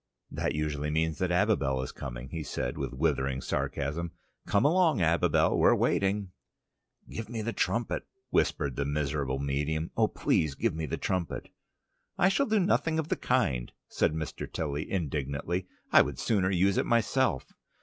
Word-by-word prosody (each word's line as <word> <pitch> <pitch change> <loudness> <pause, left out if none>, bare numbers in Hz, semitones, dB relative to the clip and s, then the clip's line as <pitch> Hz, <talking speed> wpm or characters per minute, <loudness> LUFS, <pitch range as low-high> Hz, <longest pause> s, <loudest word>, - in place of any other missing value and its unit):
"That - - -1
usually 75 -1 -1
means 80 0 0
that 90 - +1
Abibel 90 -9 +2
is - - -5
coming," 65 -1 -7
he 80 +1 -4
said, 60 -3 -3
with - - -3
withering 65 -2 0
sarcasm. 75 +5 -2 0.3
"Come 100 - +3
along, 165 - +4
Abibel: 85 0 +3
we're - - +6
waiting." 100 -1 +1 0.8
"Give 110 -1 -6
me 115 -2 -3
the 115 +1 -2
trumpet," - - -1 0.2
whispered 70 -3 +1
the 70 - +1
miserable 70 -2 -1
medium. 75 +4 -1
"Oh, - - +4
please 75 -3 0
give 115 +5 0
me 80 0 -3
the - - -2
trumpet!" 90 -3 -2 0.7
"I 190 - +5
shall 280 +8 +2
do 215 -1 +3
nothing 165 -3 +2
of 160 -1 -2
the - - +2
kind," 70 - 0 0.2
said - - +1
Mr. 80 -1 -5
Tilly 75 -1 -3
indignantly. 80 +1 -2 0.2
"I - - +8
would - - -2
sooner 100 -5 +1
use 95 +1 +2
it - - +1
myself." 115 -2 +1
80 Hz, 160 wpm, -29 LUFS, 70-100 Hz, 0.8 s, I